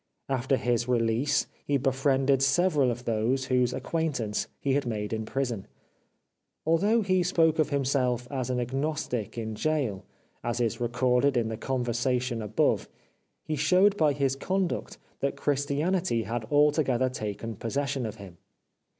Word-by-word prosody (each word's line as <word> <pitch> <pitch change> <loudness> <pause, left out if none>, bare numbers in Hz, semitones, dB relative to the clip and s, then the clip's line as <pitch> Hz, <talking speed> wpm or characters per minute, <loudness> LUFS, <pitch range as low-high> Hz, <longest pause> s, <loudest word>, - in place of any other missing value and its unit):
After 135 0 +1
his 120 -1 0
release 125 +4 +1 0.2
he 145 - +1
befriended 135 0 +2
several 145 0 +3
of 120 +1 -4
those 120 +4 0
whose 125 -1 +2
acquaintance 140 -12 -2
he 140 - 0
had 140 -2 0
made 105 -2 -3
in 110 0 -2
prison. 125 -7 -2 1.0
Although 200 +8 +3
he 185 -2 +2
spoke 165 -3 +2
of 155 - +3
himself 130 -3 0
as 130 -2 -2
an 125 -1 0
agnostic 130 -2 -2
in 110 -1 -3
gaol, 130 -6 -1 0.4
as 120 0 -2
is 120 0 -1
recorded 125 +3 +2
in 115 -2 +1
the 110 - -3
conversation 125 0 -1
above, 105 0 +1 0.5
he 155 - -2
showed 180 +7 +4
by 155 -6 +3
his 135 -1 0
conduct 185 +5 -2 0.2
that 140 - -1
Christianity 145 0 0
had 115 +2 -3
altogether 145 -2 +3
taken 110 -2 -5
possession 135 +3 -2
of 105 - -6
him. 95 -4 -12
130 Hz, 140 wpm, -28 LUFS, 120-145 Hz, 1.0 s, showed